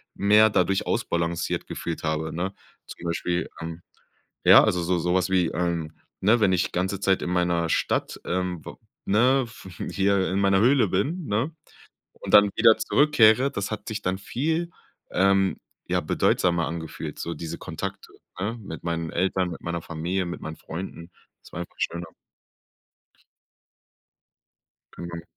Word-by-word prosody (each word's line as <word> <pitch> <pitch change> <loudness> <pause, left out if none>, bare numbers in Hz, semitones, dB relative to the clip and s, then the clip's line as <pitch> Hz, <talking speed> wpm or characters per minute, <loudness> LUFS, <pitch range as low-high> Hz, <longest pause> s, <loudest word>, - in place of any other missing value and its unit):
mehr 105 +2 +5
dadurch 95 -1 +1
ausbalanciert 85 0 -1
gefühlt 85 -1 -5
habe, 80 0 -2
ne? 95 +4 -3 0.3
Zum - - -11
Beispiel, 85 +1 -1
ähm 80 0 -6 0.6
ja, - - +9
also 90 - +1
so 90 +1 +1
so 90 +1 0
was 95 0 +1
wie, 90 -2 +3
ähm, 85 -2 -2 0.3
ne, 110 +5 +4
wenn 95 -3 +4
ich 90 -1 +1
ganze 95 +2 -1
Zeit 95 -1 +2
in - - -2
meiner 85 -2 +1
Stadt, - - -1
ähm, 90 -2 -2
w - - -8 0.3
ne, 125 +6 +3
w 110 -4 -12 0.2
w - - -6
hier 100 -1 +2
in 95 - 0
meiner 95 -1 +3
Höhle 120 -1 +4
bin, 145 - -1
ne? 115 +10 -1 0.6
Und - - -8
dann 100 0 +8
wieder 115 -1 +6
zurückkehre, 130 -3 +4
das 100 -6 -3
hat 110 - -5
sich 110 -1 -4
dann 95 -1 -1
viel, 160 - -1 0.4
ähm, 95 0 +3 0.3
ja, - - +1
bedeutsamer 85 -2 +1
angefühlt, 80 -1 -6
so 85 - -3
diese 80 -1 -6
Kontakte, - - -6 0.3
ne? 110 +5 -2
Mit 90 -5 -8
meinen 85 -1 -2
Eltern, 95 0 0
mit 85 - -8
meiner 85 0 -3
Familie, 85 +4 -2
mit 85 0 -6
meinen 80 - -6
Freunden. 85 0 -8 0.3
Das - - -16
war - - -5
einfach 85 - -10
schöner. 85 0 -2 2.9
Genau. 85 -1 -7
95 Hz, 155 wpm, -25 LUFS, 85-105 Hz, 2.9 s, ja